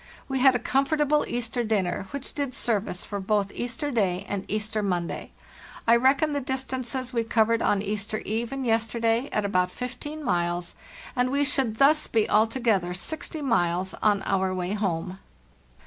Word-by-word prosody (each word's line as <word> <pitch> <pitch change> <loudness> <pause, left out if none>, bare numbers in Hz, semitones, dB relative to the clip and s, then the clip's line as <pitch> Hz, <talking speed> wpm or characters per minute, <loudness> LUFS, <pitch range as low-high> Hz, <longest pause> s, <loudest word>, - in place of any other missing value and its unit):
We 270 -1 -1
had 260 0 +6
a 245 - -3
comfortable 295 +2 +2
Easter 240 0 -2
dinner, 195 -4 -1
which 280 -1 -6
did 280 -3 -3
service 205 -5 -1
for 205 - -4
both 200 0 0
Easter 245 +5 -3
day 190 -7 0
and 200 -1 -3
Easter 215 +1 -1
Monday. 180 -4 -2 0.6
I 230 - +7
reckon 275 +5 +3
the 285 - -1
dis 265 0 -2
tances 255 -1 -4
we 230 -1 +1
covered 225 0 +2
on 200 -1 +2
Easter 210 +1 -2
eve 225 +2 -2
and 270 -1 -3
yesterday 230 +2 +1
at 210 - 0
about 185 -2 +2
15 275 +8 -6
miles, 175 -3 -1 0.4
and 250 0 +2
we 280 +2 +2
should 265 -6 +1
thus 295 +5 +4
be 220 -2 +2
altogether 215 -5 +2
60 315 - -4
miles 185 -7 +1
on 205 -2 +3
our 190 -1 +1
way 180 +1 -2
home. 190 -2 -2
225 Hz, 165 wpm, -26 LUFS, 195-260 Hz, 0.6 s, I